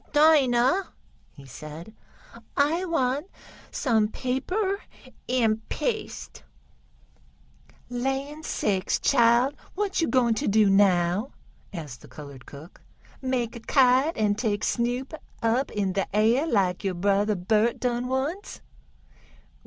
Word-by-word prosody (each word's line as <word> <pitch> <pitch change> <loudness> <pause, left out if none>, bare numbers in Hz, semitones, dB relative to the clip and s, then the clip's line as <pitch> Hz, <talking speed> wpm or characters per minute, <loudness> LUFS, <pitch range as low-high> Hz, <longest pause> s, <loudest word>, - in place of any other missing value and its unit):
"Dinah," 295 +2 +4 0.4
he 140 - -15
said, 155 - -10 0.6
"I 320 +6 +2
want 285 -2 0 0.4
some 225 -6 +1
paper 375 - -2 0.5
and 225 -3 +1
paste." 440 -4 -4 1.5
"Land 270 +5 -3
sakes, 195 -9 -1
chile! 240 +1 +3 0.2
what 400 -2 -1
yo' 325 - +1
gwine 245 -3 +3
t' 220 - -2
do 210 -1 +4
now?" 195 +3 +2 0.4
asked 150 -10 -8
the - - -14
colored 140 -4 -11
cook. 150 +5 -13 0.4
"Make 255 -3 -2
a - - -7
kite, 260 +5 +3
an' 210 -2 +2
take 210 -1 -2
Snoop 245 +4 -1 0.3
up 235 +4 +1
in 195 -2 -1
de 195 0 -1
air 230 +8 +3
laik 190 - +1
yo' 190 -2 -1
brother 200 +3 +1
Bert 215 +5 +1
done 245 0 -1
once?" 275 +10 -3
235 Hz, 115 wpm, -26 LUFS, 205-270 Hz, 1.5 s, Dinah